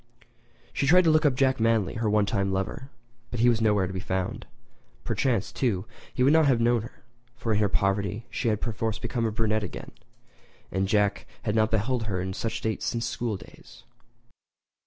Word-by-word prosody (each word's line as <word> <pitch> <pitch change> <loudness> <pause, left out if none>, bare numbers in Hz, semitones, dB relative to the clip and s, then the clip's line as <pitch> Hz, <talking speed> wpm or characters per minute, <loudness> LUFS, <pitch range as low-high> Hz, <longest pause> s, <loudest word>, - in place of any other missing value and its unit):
She 140 - 0
tried 180 +5 +6
to 165 - +4
look 155 0 +4
up 135 - +1
Jack 130 -1 +2
Manly, 115 -3 +2
her 115 -1 -1
one 105 0 +3
time 100 -2 0
lover, 95 +8 -3 0.4
but 120 - -5
he 120 +2 +5
was 115 -1 +1
nowhere 105 -3 +3
to 95 - -5
be 95 - -3
found. 95 0 -3 0.6
Perchance, 115 -7 0
too, 105 -7 -1 0.3
he 125 - 0
would 140 +3 +5
not 160 -2 +5
have 130 -4 +3
known 120 0 +3
her; 115 - -12 0.3
for 115 -1 -2
in 105 - +2
her 105 -2 +2
poverty 100 +3 0
she 125 - -2
had 105 -2 +1
perforce 115 -2 -2
become 115 0 -2
a - - -2
brunette 110 -1 0
again, - - -7 0.8
and 95 +1 0
Jack 100 0 +1 0.2
had 105 -4 -1
not 110 0 +3
beheld 110 +2 0
her 100 -4 -2
in 95 +1 -3
that 115 +4 -3
state 110 -1 -3
since 115 -1 -1
school 115 -4 -2
days. - - -15
110 Hz, 200 wpm, -27 LUFS, 100-120 Hz, 0.8 s, tried